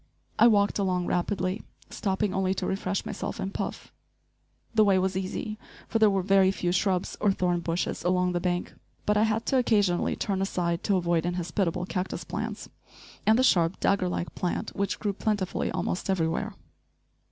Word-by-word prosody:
I - - +8
walked 205 -2 +3
along 180 -2 0
rapidly, 185 +2 -1 0.3
stopping 195 -1 -1
only 190 0 +1
to - - -2
refresh 190 0 -2
myself - - -4
and 195 0 -3
Puff. - - -5 0.8
The 220 -1 +5
way 200 -2 +4
was 185 0 0
easy, 195 +3 -3 0.3
for 225 - 0
there 215 -1 +6
were 195 -2 +1
very 195 0 +5
few 180 -2 -1
shrubs 185 0 0
or 205 - +4
thorn 180 -2 0
bushes 170 +1 -2
along 180 0 +2
the 175 - 0
bank. 175 0 -2 0.3
But 210 - +2
I 210 +1 +4
had 220 +1 -1
to 270 - +2
occasionally 205 -8 +2
turn 195 -2 -1
aside 175 -3 -1
to 200 -3 +3
avoid 170 -2 +1
inhospitable 175 0 -1
cactus 185 0 -3
plants, - - -5 0.6
and 220 +1 +6
the 255 - +3
sharp, 170 -7 +3
dagger 190 -2 +2
like 175 - -3
plant 180 +4 -3
which 200 0 -1
grew 205 -2 -1
plentifully 205 -2 -1
almost 180 - -2
everywhere. 190 +3 0
190 Hz, 175 wpm, -27 LUFS, 180-205 Hz, 0.8 s, I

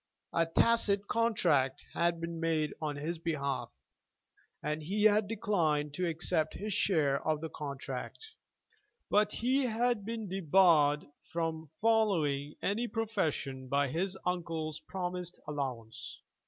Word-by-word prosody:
A 165 0 +2
tacit 205 +2 +3
contract 150 - +2
had 170 0 +1
been 170 0 -4
made 160 -2 0
on 150 -2 -2
his 160 +4 -3
behalf, 140 -7 -2 0.9
and 150 +1 -1
he 200 +7 -1
had 215 -1 +5
declined 160 -9 0
to 180 +3 -1
accept 160 -1 0
his 210 +1 -3
share 155 -8 +2
of 155 -1 +1
the 160 +1 -5
contract. 140 -3 -5 0.9
But 210 0 +4
he 255 +4 +2
had 235 -1 +1
been 225 0 -4
debarred 165 -5 +4 0.3
from 165 -2 -2
following 170 -11 +2
any 225 +5 0
profession 155 - -2
by 140 +1 +1
his 185 +6 -1
uncle's 165 -3 -2
promised 180 -1 -4
allowance. 130 -7 -5
165 Hz, 125 wpm, -32 LUFS, 150-205 Hz, 0.9 s, had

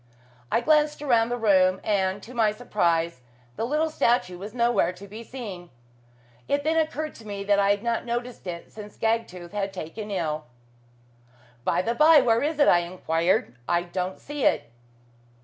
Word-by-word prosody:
I 230 - +2
glanced 300 +1 +2
around 235 -4 +3
the 245 - -1
room, 190 -4 +3
and, 195 -1 0
to 250 - -11
my 225 -3 +3
surprise, 170 - 0 0.3
the 225 - -2
little 310 +3 0
statue 185 -11 +1
was 205 +3 -7
nowhere 235 -5 +2
to 190 +2 -12
be 215 +3 -9
seen. 205 -9 -8 0.8
It 285 0 0
then 315 +2 +1
occurred 310 -1 -1
to 225 - -13
me 200 -1 -4
that 200 0 +3
I 200 0 +3
had 205 +1 +1
not 235 -1 0
noticed 240 -3 -4
it 170 -1 -6
since 210 -1 -11
Gagtooth 220 -6 -2
had 200 -1 -2
been 190 - -5
taken 210 +6 -8
ill. 155 -6 -2 1.2
"By 180 - +1
the 230 - 0
by, 305 +4 +7
where 230 -3 +3
is 300 +1 -1
it?" 290 - +4
I 175 - +6
enquired 170 -5 0
"I 175 0 +2
don't 180 +1 -4
see 290 -1 -5
it." - - +2
210 Hz, 180 wpm, -25 LUFS, 185-245 Hz, 1.2 s, by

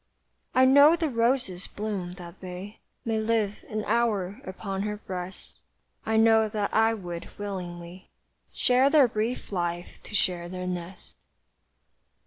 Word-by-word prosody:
I 260 - +6
know 285 +5 +7
the 325 -2 -1
roses 230 -6 0
bloom 200 -4 -4
that 175 -2 -11
they 185 +3 -8 0.3
May 225 -1 0
live 220 -2 0
an 215 -1 -3
hour 215 -2 0
upon 195 +1 -4
her 210 0 -2
breast; 185 -2 -8 0.5
I 220 0 +2
know 220 -1 +5
that 210 -1 -2
I 225 +1 +4
would 175 -4 -7
willingly 180 -2 -6 0.4
Share 255 +2 +3
their 285 -4 +6
brief 225 +2 -3
life 175 -2 -3
to 210 - -8
share 175 -3 0
their 180 0 -5
nest. 180 0 -6
205 Hz, 135 wpm, -27 LUFS, 180-225 Hz, 0.5 s, know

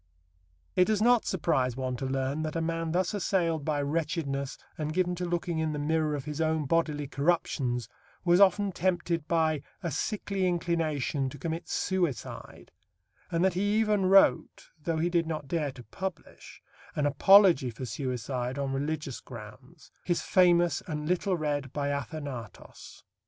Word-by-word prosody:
It 180 - +5
does 215 0 +1
not 240 +1 +4
surprise 135 -9 0
one 130 -1 -2
to 135 - -3
learn 135 +3 -1
that 155 0 -3
a - - +1
man 165 0 -2
thus 180 +2 0
assailed 170 -6 0
by 145 -1 0
wretchedness 145 -2 -2 0.2
and 155 0 -3
given 180 -1 +1
to 180 0 -3
looking 170 -1 -2
in 160 -1 0
the - - -3
mirror 155 0 0
of 140 -1 -5
his 150 +1 -4
own 160 -1 +1
bodily 150 -1 0
corruptions 140 - 0 0.4
was 175 +1 +5
often 200 +1 +4
tempted, 175 -3 -1
by 160 -3 +1 0.2
"a 170 - -2
sickly 200 -1 -1
inclination," 160 -5 0
to 145 - -10
commit 165 +4 -4
suicide, 175 - -3 0.6
and 170 +2 +1
that 190 - +2
he 205 +3 +1
even 210 -3 +2
wrote, 195 +1 +3
though 165 +1 -1
he 165 +2 +1
did 170 -2 +1
not 155 -3 -4
dare 150 -1 -1
to 125 -2 -12
publish, 190 - -8 0.3
an 150 - 0
apology 165 -1 +6
for 120 +3 -6
suicide 125 -1 -3
on 135 -1 -2
religious 145 -1 -3
grounds, 125 +7 -12
his 175 -1 0
famous 175 -2 +4
and 150 -2 -4
little 180 +1 +1
read 145 -4 -2
Biathanatos. 140 -4 -5
160 Hz, 155 wpm, -29 LUFS, 140-175 Hz, 0.6 s, apology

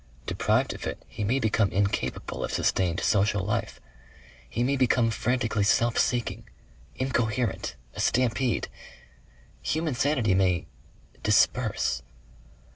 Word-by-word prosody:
Deprived - - +1
of - - -6
it - - -6
he 105 - -5
may 120 +7 +1
become 110 -3 +2
incapable 100 +1 -1
of - - -3
sustained 90 -1 +1
social 100 -1 +2
life. 105 - -2 0.7
He 120 - -1
may 135 +3 +2
become 125 -3 +3
frantically 115 -2 0
self 115 +3 +3
seeking 115 -3 -1 0.5
incoherent... 125 -4 -1 0.2
a - - -9
stampede.... 125 -2 +1 0.9
Human 160 -2 -1
sanity 125 -5 +1
may 95 -2 +2 0.6
DISPERSE. 60 - +2
115 Hz, 115 wpm, -27 LUFS, 100-125 Hz, 0.9 s, become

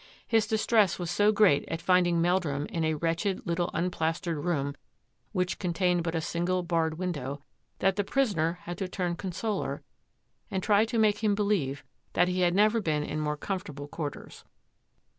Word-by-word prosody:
His 225 -2 +3
distress 215 -2 +3
was 175 -2 -3
so 205 +3 +4
great 205 -9 +4
at 165 - -2
finding 175 -1 +3
Meldrum 165 -5 +1
in 165 +1 -3
a 160 0 +1
wretched 165 +5 -1
little 170 0 0
unplastered 165 -2 -1
room, 140 -5 0 0.6
which 180 -3 -1
contained 180 -1 +1
but 165 0 -2
a 165 - 0
single 175 +3 -1
barred 165 -2 0
window, 145 -6 -4 0.3
that 195 +1 +1
the 205 - +2
prisoner 190 - +1
had 175 0 -6
to 190 - -2
turn 180 -1 -2
consoler 195 +4 -3 0.7
and 190 -1 -2
try 210 0 +4
to 230 +1 -3
make 215 0 +2
him 210 -2 +3
believe 195 -10 0 0.3
that - - +3
he 180 0 -1
had 175 0 +3
never 215 +3 +4
been 155 -5 0
in 155 - -3
more 150 -1 -1
com 190 +5 -2
fortable 145 -7 -8
quarters. 150 -4 -6
175 Hz, 175 wpm, -28 LUFS, 165-200 Hz, 0.7 s, so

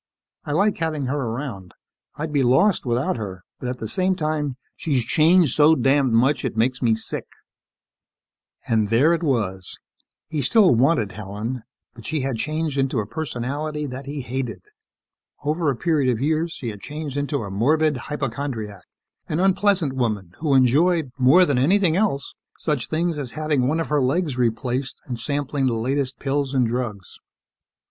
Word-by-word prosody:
I - - -4
like 200 +6 +2
having 155 -4 -1
her 130 +3 -1
around. 115 -6 -5 0.4
I'd 155 0 -4
be 145 - +3
lost 135 +7 +3
without 120 +2 0
her, 95 -4 -6 0.2
but 125 - -4
at 125 - -4
the 110 - -5
same 185 - +1
time, 150 -5 -2 0.2
she's 135 -7 -1
changed 160 0 +4
so 155 +2 +6
damned 135 -1 +2
much, 130 +4 +3
she - - -1
makes 120 +4 0
me 115 -3 +3
sick." 110 - -4 1.4
And 110 -2 +2
there 130 +10 +4
it 170 - -1
was. 105 - -1 0.5
He 155 -3 -2
still 190 - +5
wanted 120 - +2
Helen 105 +5 -5 0.3
but 115 -2 -11
she 155 -1 -1
had 130 -3 -2
changed 155 +2 -2
into 135 -1 0
a 105 - -2
personality 150 +3 -3
that 135 0 -7
he 145 0 -4
hated. 125 +1 -4 0.8
Over 155 +2 0
a 135 - 0
period 145 -2 +1
of 115 - -2
years, 160 +4 0
she 120 - -5
had 105 -2 -8
changed 150 +1 -6
into 145 -2 -1
a 100 - -6
morbid 150 +9 +2
hypochondriac, 120 -7 -4 0.5
an 155 - -1
unpleasant 190 -5 +2
woman 110 -8 -2
who 150 -3 +2
enjoyed 145 +4 +3
more 140 +9 +6
than 140 -6 +1
anything 175 +4 +3
else 190 -9 0 0.2
such 145 -8 -2
things 165 0 0
as 130 -4 -5
having 150 -4 0
one 155 +4 +1
of 165 - -2
her 150 -1 +2
legs 145 +2 0
replaced 125 +2 -1
and 120 -3 -5
sampling 140 +1 -1
the 125 - +1
latest 130 +3 -1
pills 140 0 -1
and 130 -2 +3
drugs. 115 -5 -4
135 Hz, 170 wpm, -23 LUFS, 120-155 Hz, 1.4 s, so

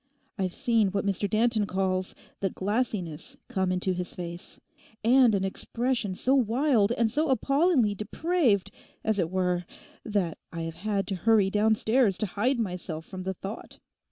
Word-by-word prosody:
I've 185 -3 -2
seen 230 -6 +2
what 200 +1 -2
Mr 200 0 0
Danton 220 0 +2
calls 185 -1 -1 0.2
the 195 - 0
"glassiness" 195 -7 -2
come 190 -1 0
into 185 +1 0
his 180 0 -5
face, 175 0 -7 0.4
and 240 -1 +5
an 190 - 0
expression 230 +1 -1
so 260 +7 +1
wild 245 -3 +3
and 230 -2 +1
so 305 +5 +1
appallingly 275 - +3
depraved, 215 - +1 0.3
as 220 -2 +1
it 165 -3 +1
were, 180 -1 0 0.4
that 200 -7 -1
I 165 - -5
have 165 0 -4
had 200 +1 -1
to 195 - -1
hurry 200 +1 +3
downstairs 220 0 +2
to - - -1
hide 235 +7 0
myself 180 -6 -4
from 185 -2 -7
the 190 +1 -3
thought. 195 +5 -8
205 Hz, 155 wpm, -27 LUFS, 185-235 Hz, 0.4 s, and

